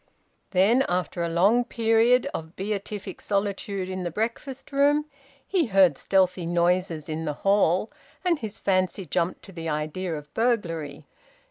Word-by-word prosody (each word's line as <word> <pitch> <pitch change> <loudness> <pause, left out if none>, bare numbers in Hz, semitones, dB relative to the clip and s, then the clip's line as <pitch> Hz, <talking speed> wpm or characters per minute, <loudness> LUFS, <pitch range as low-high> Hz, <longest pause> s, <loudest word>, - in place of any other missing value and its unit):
Then, 205 +8 +4
after 180 0 -1
a 170 - 0
long 200 +9 +3
period 230 +3 +3
of 160 +1 -6
beatific 200 0 -5
solitude 200 -1 -2
in 185 0 -4
the 175 - -2
breakfast 235 - -4
room, 290 +2 +3 0.4
he 355 -7 +1
heard 190 -7 +5
stealthy 185 -1 +1
noises 175 -2 +1
in 160 0 -3
the 150 - -1
hall, 195 0 +3 0.3
and 340 -4 +2
his 220 -2 -6
fancy 185 0 0
jumped 170 +3 -1
to 195 - -12
the 165 -2 -5
idea 155 +3 -2
of 150 0 -12
burglary. 165 -11 -1
190 Hz, 145 wpm, -25 LUFS, 170-225 Hz, 0.4 s, heard